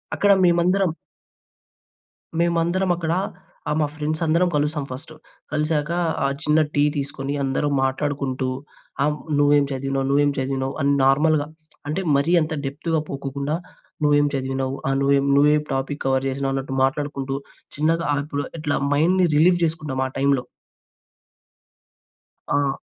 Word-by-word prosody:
అక్కడ 205 0 +3
మేమందరం... 180 +2 +3 1.5
మేమందరం 170 +2 +1
అక్కడా 170 +1 -1 0.5
ఆహ్, 150 - 0
మా 150 - +2
ఫ్రెండ్స్ 155 +2 -2
అందరం 170 +3 +2
కలుస్తాం 150 0 0
ఫస్టు. 155 +5 -8 0.4
కలిసాక 150 0 0 0.4
ఆ - - +3 0.2
చిన్న 150 +1 +3
టీ 145 - +3
తీసుకొని, 140 0 -3
అందరం 135 +2 0
మాట్లాడుకుంటూ 135 -1 -1 0.5
ఆహ్, 150 +1 +1 0.2
నువ్వేం 145 0 +4
చదివినావు, 135 0 -2
నువ్వేం 145 +1 +3
చదివినావు 135 0 -2
అని 140 0 +3
నార్మల్‌గా 145 +2 +3 0.4
అంటే, 155 +6 -1
మరీ 140 +5 +2
అంత 155 0 -2
డెప్త్‌గా 160 +4 -1
పోకోకుండా. 140 +2 -3 0.5
నువ్వేం 145 0 +4
చదివినావు, 135 0 -2
ఆహ్, 135 - +1
నువ్వేం, 140 0 +3
నువ్వేం 150 +1 +4
టాపిక్ 135 +2 -3
కవర్ 135 0 +1
జేసినావు 135 0 -1
అన్నట్టు 135 0 -3
మాట్లాడుకుంటూ 135 0 -1 0.4
చిన్నగా, 165 +3 +1
ఆహ్, 145 - 0
ఇప్పుడు 145 -1 -3 0.2
ఇట్లా 150 -1 -1 0.2
మైండ్‌ని 180 +5 +3
రిలీవ్ 175 +4 +5
చేసుకుంటాం. 155 -4 -3
ఆ - - -7
టైమ్‌లో. 140 -2 +2 2.1
ఆ! 140 -1 0
145 Hz, 130 wpm, -22 LUFS, 135-155 Hz, 2.1 s, రిలీవ్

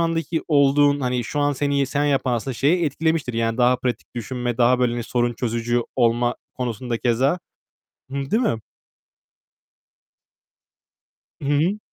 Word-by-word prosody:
andaki 165 0 -1
olduğun, 145 -1 +4
hani, 125 -2 -1
şu 145 +4 -3
an 145 0 +2
seni 140 0 0
sen 145 +2 -1
yapan, 135 -3 +1
aslında, 120 +2 -2
şeyi 165 +7 +2
etkilemiştir. 155 -2 0
Yani, 115 0 0
daha 125 0 +4
pratik 125 -2 -4
düşünme, 120 0 -3
daha 125 +1 +4
böyle, 125 -2 +2
hani, 120 0 -3
sorun 120 +1 0
çözücü 120 0 -1
olma 120 0 +2 0.2
konusunda 120 -1 -3
keza. 130 +8 +1 0.7
Hıı. 140 0 -4
Değil 230 +4 +2
mi? 165 - +1 2.8
Hı 140 - -3
hı. 165 +8 +2
130 Hz, 140 wpm, -22 LUFS, 120-145 Hz, 2.8 s, olduğun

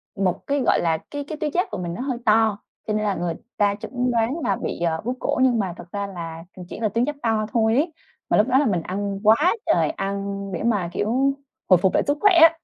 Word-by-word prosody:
một 190 -3 -1
cái, 285 0 +1
gọi - - +4
là, 165 -2 +1
cái 290 0 -4
cái 310 - -5
tuyến 300 -1 -2
giáp 360 +4 +1
của - - -3
mình 175 -2 -4
nó 205 - -5
hơi 260 -2 -2
to, 220 -1 +4 0.3
cho 215 - 0
nên 215 0 0
là 205 -2 0
người 175 -1 -2 0.2
ta 205 -1 +2
chẩn 250 +4 -2
đoán 235 +6 0
là 200 -5 +1
bị, - - -4
ờ, 165 -2 0
bướu 250 +2 -1
cổ, - - -1
nhưng 245 -3 +3
mà 190 -4 -1
thật - - -10
ra 200 0 -3
là, 165 -3 -7
ừm, 180 - -8
chỉ - - -7
là 220 -2 +1
tuyến 230 +4 +1
giáp 295 +1 -3
to 220 -2 +1
thôi 225 -1 +3
ấy. 315 +5 +1 0.4
Mà - - +3
lúc 210 - +4
đó 260 0 +3
là 290 - +2
mình 190 -8 +1
ăn 195 +3 -3
quá 225 - +5
trời - - +2
ăn 200 -6 -3
để 170 - -3
mà, 205 -7 +1
kiểu, 260 +8 +1 0.4
hồi 185 - +8
phục 185 +2 +1
lại - - +3
sức 290 +1 +1
khỏe 415 -2 +6
á. 330 0 +7
215 Hz, 265 wpm, -23 LUFS, 195-260 Hz, 0.4 s, hồi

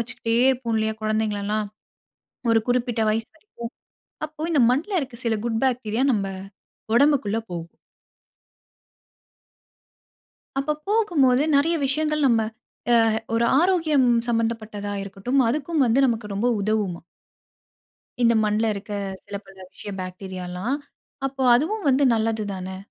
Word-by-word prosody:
வச்சுக்கிட்டே 230 -1 -2 0.2
இருப்போம் 240 -3 -2
இல்லயா! 220 0 0
குழந்தைங்கள 215 -1 0
எல்லாம். 210 0 0 0.9
ஒரு 225 - +4
குறிப்பிட்ட 245 -1 0
வயது 225 +1 -1
வரைக்கும். 235 - -9 0.5
அப்போ 310 0 -12
இந்த 285 - +4
மண்ல 300 +11 -1
இருக்க 270 -3 -6
சில 225 -1 +2
குட் 225 0 -1
பாக்டீரியா 245 -2 0
நம்ப 200 -3 0 0.7
உடம்புக்குள்ள 265 -5 +3
போகும். 170 -1 -7 2.8
அப்ப 300 +2 0
போகும்போது 320 - +3
நறைய 325 +4 +3
விஷயங்கள், 305 +1 +1
நம்ம 235 -3 +4 0.5
அ - - +7 0.4
ஒரு 230 +1 +2 0.2
ஆரோக்கியம் 325 -7 +3 0.2
சம்பந்தப்பட்டதா 225 -3 -2
இருக்கட்டும், 200 +7 -1
அதுக்கும் 300 +3 0
வந்து 235 +4 +2
நமக்கு 230 -3 -1
ரொம்ப 205 +5 0
உதவுமாம். 200 -5 -1 1.2
இந்த 235 0 +5
மண்ல 215 +1 +1
இருக்க 200 +1 -7 0.3
சில 200 - -6
பல 195 0 -16 0.2
விஷய 205 - -8
பாக்டீரியாலாம், 185 +4 -4 0.5
அப்ப 270 0 -8 0.2
அதுவும் 330 - -2
வந்து 270 +1 +4
நல்லதுதானே? 205 -4 -2
230 Hz, 120 wpm, -24 LUFS, 210-275 Hz, 2.8 s, அ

